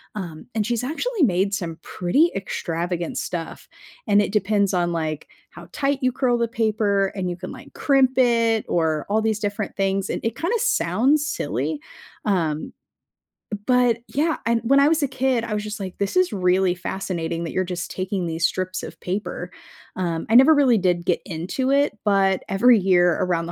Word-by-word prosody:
Um, 170 -6 -7
and 215 -2 0
she's 240 +1 -1
actually 365 - -1
made 195 -3 +2
some 170 -4 -3
pretty 275 - +1
extravagant 175 -2 -3
stuff, 165 -2 -5 0.4
and 205 - +4
it 205 - -2
depends 200 -1 +1
on, 175 -1 +1
like, 155 -2 -3 0.2
how - - -12
tight 280 -1 0
you 255 -1 +2
curl 250 -1 +1
the 235 - +1
paper, 215 -3 +1
and 185 -3 -3
you 175 - -3
can, 185 0 -7
like, - - -12
crimp 265 -2 +2
it 230 -3 +3
or 160 -3 0
all 220 +1 +2
these 220 -1 0
different 205 0 -3
things, 195 0 0
and - - -3
it 230 0 -1
kinda 360 - 0
sounds 295 - +2
silly. 145 +3 -2 0.5
Um, 165 -7 -1 0.9
but 250 -2 +3
yeah, 315 +3 0
and 230 0 +2
when 275 +4 +4
I 280 - +5
was 315 -1 +2
a - - +2
kid, 255 -2 0
I 230 -2 -4
was 210 0 -2
just 215 +1 -6
like, 190 -2 -7
"This 200 - -1
is 365 -9 +3
really 185 -1 +2
fascinating 170 -2 -4
that 165 - -4
you're 185 - 0
just 180 -1 -5
taking 185 0 -3
these 165 0 +1
strips 185 0 -3
of - - -9
paper." 190 +3 -4 0.4
Um, 170 -3 -2
I 225 - -1
never 265 +6 +8
really 260 -6 +4
did 175 -2 0
get 175 - +1
into 180 +10 -3
it, 280 -4 +2
but 195 -2 +2
every 230 +4 +5
year 180 -2 +4
around 175 -2 0
the 170 - -6
200 Hz, 190 wpm, -23 LUFS, 175-245 Hz, 0.9 s, never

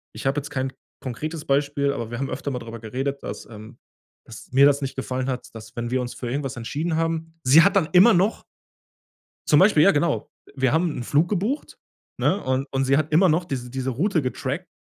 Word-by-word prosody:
Ich - - -8
habe 140 +2 +1
jetzt 145 +2 -8
kein 130 -1 -3 0.3
konkretes 155 +5 -5
Beispiel, 140 0 +1
aber 115 -4 -5
wir 120 - -4
haben 135 - -2
öfter 140 +2 -4
mal 125 - -3
drüber 115 0 -8
geredet, 135 +5 -4
dass, 105 - -6
ähm 110 +2 -12 0.5
dass - - -12
mir 140 +2 +6
das 140 0 +2
nicht 135 - -4
gefallen 130 0 -3
hat, 130 -1 -4
dass, 110 +1 -11
wenn 120 -1 -3
wir 130 +1 0
uns 125 -1 -4
für 120 - -6
irgendwas 135 0 -3
entschieden 150 +8 -3
haben 165 0 -2
sie 145 +6 +7
hat 200 - +3
dann 180 -5 +2
immer 190 +5 +7
noch 190 +5 +1 1.0
zum 150 - +5
Beispiel, 185 -6 +5
ja, 195 - +7
genau. 160 +4 0 0.3
Wir 130 -2 +1
haben 165 0 +2
'n 120 - -4
Flug 150 +6 +2
gebucht, 210 - -2 0.4
ne, 200 - +1
und 130 +2 -1
und 135 0 0
sie 135 +1 +3
hat 155 +1 -1
immer 175 +4 +5
noch 170 +3 +1
diese 125 -5 -5
diese 130 +1 -3
Route 165 - +1
getrackt 135 +6 -4
140 Hz, 220 wpm, -23 LUFS, 130-160 Hz, 1.0 s, sie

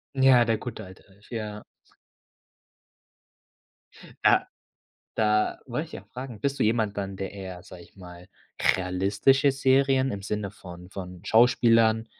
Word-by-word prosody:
Ja, 130 -2 +6
der 115 -2 0
gute 120 -3 -7
alte 95 0 -15
Alf, 100 +2 -22
ja. 105 -3 -5 2.6
Ja, - - +4 0.7
da 105 -1 +1
wollte - - -5
ich - - -9
auch - - -26
fragen, 125 -4 -8
bist 140 +5 -2
du - - +3
jemand 110 -2 0
dann, 100 -1 -4
der 95 -1 -5
eher, 95 -3 -8
sage 90 -1 -12
ich - - -22
mal, 90 -2 -13 0.5
realistische 100 +10 +2
Serien 135 0 +2
im 100 - -5
Sinne 105 0 -3
von 90 -2 -12
von 90 -2 -8
Schauspielern 115 0 +4
105 Hz, 140 wpm, -26 LUFS, 95-120 Hz, 2.6 s, Ja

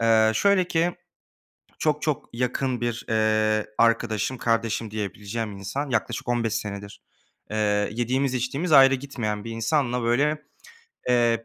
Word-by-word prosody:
Eee, 110 -1 +4
şöyle 190 - +3
ki 170 +2 +1 0.9
çok, 150 -1 +1
çok 150 -3 -2
yakın 125 +1 -1
bir, 120 -1 -2
eee, 110 -1 +2
arkadaşım, 115 +1 +1
"kardeşim" 115 -1 0
diyebileceğim 105 +1 -4
insan 135 +9 -4
yaklaşık 120 0 -2
15 115 -2 0
senedir, 100 -1 -6 0.5
eee, 105 -1 +1
yediğimiz 130 +3 0
içtiğimiz 135 +7 -2
ayrı 135 -2 +8
gitmeyen 115 -6 -4
bir 115 - -6
insanla, 125 +2 0
böyle, 145 +6 +1 0.7
eee, 120 -2 +3
115 Hz, 125 wpm, -25 LUFS, 110-135 Hz, 0.9 s, ayrı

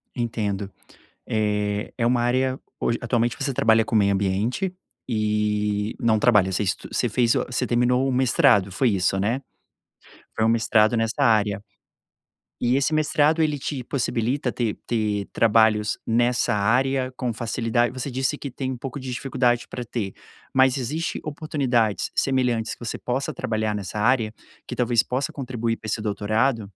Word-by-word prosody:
Entendo, 105 -5 -2 0.6
eh, 105 -1 -1
é 115 - 0
uma 120 0 +2
área 130 +2 +1 0.2
hoje, 115 - 0
atualmente 120 0 0
você 140 - -1
trabalha 110 -1 +3
com 115 - -2
meio 100 -1 +4
ambiente 105 - -1 0.3
e 105 -1 0
não 110 -2 +3
trabalha, 105 -6 +4
você 105 - 0
estu 95 - -2
você - - 0
fez 120 -2 +2
você 125 - -1
terminou 125 +2 +2
o - - 0
mestrado, 125 - +3
foi 120 +6 +2
isso, 95 0 +1
né? 115 +7 0 0.9
Foi 110 - 0
um - - +3
mestrado 115 0 +3
nesta 115 +5 0
área. 105 -3 +2 1.0
E 120 +1 +1
esse 140 +3 +1
mestrado 155 +1 +2
ele 150 -2 +1
te 130 -2 -4
possibilita 125 0 -1
ter 115 -4 -2
ter 105 -3 -1
trabalhos 110 -2 +3
nessa 120 0 +2
área 130 +5 +1
com 125 -2 -2
facilidade 120 +1 0
você 130 +2 -5
disse 130 +3 -1
que 140 - -6
tem 130 +1 -4
um 125 - -6
pouco 135 +3 -6
de 130 -1 -6
dificuldade 125 -2 0
pra 125 - -6
ter, 105 -5 -4 0.4
mas 130 0 +4
existe 150 +7 -3
oportunidades 135 -8 -1
semelhantes 125 -4 +1
que - - -17
você - - -3
possa 135 +5 -2
trabalhar 110 -3 -1
nessa 100 +1 -5
área, 115 -1 +2 0.3
que - - -5
talvez 120 -2 +2
possa 130 +2 -2
contribuir 120 -4 -3
para 110 - -12
esse 110 - -1
doutorado? 110 +3 0
120 Hz, 160 wpm, -24 LUFS, 110-130 Hz, 1.0 s, meio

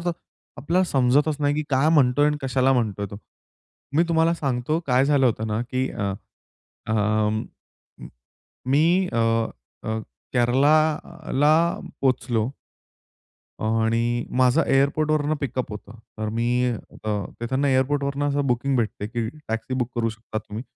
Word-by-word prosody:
थर. 175 - +2 0.4
आपल्याला 170 +9 +1
समजतच 145 +1 +2
नाही 145 0 +2
की 155 - -1
काय 135 +3 +3
म्हणतोय 145 -2 +4
आणि 150 0 +1
कशाला 135 0 +2
म्हणतोय 105 -5 -1
तो? 100 - -7 0.8
मी 165 - +6
तुम्हाला 165 0 +3
सांगतो 135 +1 -1
काय 130 0 +3
झालं 140 -2 +3
होतं 110 -2 0
ना, 105 +1 -1
की 130 +1 0
अ, 100 -2 -2 0.8
अं, 110 0 +1 1.3
मी 170 +7 +3
अ, - - 0 0.7
अ, 110 0 -2 0.3
केरलाला 150 +4 +2 0.5
पोहोचलो. 120 -3 +1 1.2
आणि 115 +2 +1
माझं 130 +5 +4
एअरपोर्टवरनं 150 +2 +2
पिकअप 130 -2 -3
होतं. 105 +2 -10 0.2
तर 110 - -2
मी 120 +1 +1 0.3
तिकडनं 115 +6 -2
एअरपोर्टवरनं 140 +2 +1
असं 140 0 0
बुकिंग 130 +2 +1
भेटते 110 -3 -2
की 115 0 -3 0.2
टॅक्सी 115 +3 -3
बुक 125 -1 -1
करू 115 -2 0
शकता 110 0 -6
तुम्ही. 110 +2 -7
130 Hz, 125 wpm, -24 LUFS, 115-145 Hz, 1.3 s, मी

